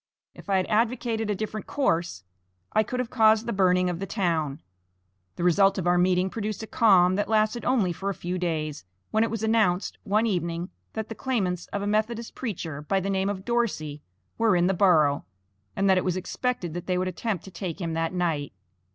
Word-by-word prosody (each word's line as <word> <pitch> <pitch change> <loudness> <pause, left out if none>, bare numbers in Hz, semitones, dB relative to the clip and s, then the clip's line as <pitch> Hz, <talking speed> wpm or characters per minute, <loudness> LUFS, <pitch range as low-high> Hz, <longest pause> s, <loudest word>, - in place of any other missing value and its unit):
If - - -14
I 195 - +3
had 185 - +1
advocated 225 0 0
a 210 - +1
different 215 +1 -5
course 170 - 0 0.5
I - - +5
could 250 +4 -3
have 250 -2 -2
caused 220 -1 +4
the 235 - -2
burning 185 -2 +3
of 175 -1 -2
the 195 - -4
town. 160 -7 -1 0.7
The - - -4
result 195 +3 +4
of 185 - -2
our 175 0 +3
meeting 180 +1 +3
produced 215 0 -4
a - - -4
calm, 185 -5 +4
that 205 0 -1
lasted 220 +2 +2
only 220 -9 +2
for 195 +4 -3
a 200 - -3
few 180 +1 -4
days, 155 - -2 0.3
when 220 +1 +3
it 230 - 0
was 225 -1 -4
announced, 220 -5 +1
one 215 +1 +2
evening, 175 -3 -2 0.2
that 220 -1 -4
the - - -4
claimants 195 -9 -2
of 200 - -4
a - - -2
Methodist 220 +3 -1
preacher, 165 - -5
by 195 +6 0
the 195 +1 -2
name 190 0 0
of 195 -1 -4
Dorsey, 195 -12 -1 0.4
were 225 -4 +4
in 175 0 +3
the 190 - +2
borough, 160 -7 +4 0.5
and 195 - +1
that 190 -1 +5
it - - -3
was 180 -1 0
expected 185 -2 -2
that 175 0 -6
they 180 -1 +1
would 185 +1 0
attempt 185 +1 -3
to 190 - -11
take 180 -1 -5
him 165 -3 -3
that 165 0 -1
night. 165 - -1
190 Hz, 210 wpm, -26 LUFS, 175-220 Hz, 0.7 s, I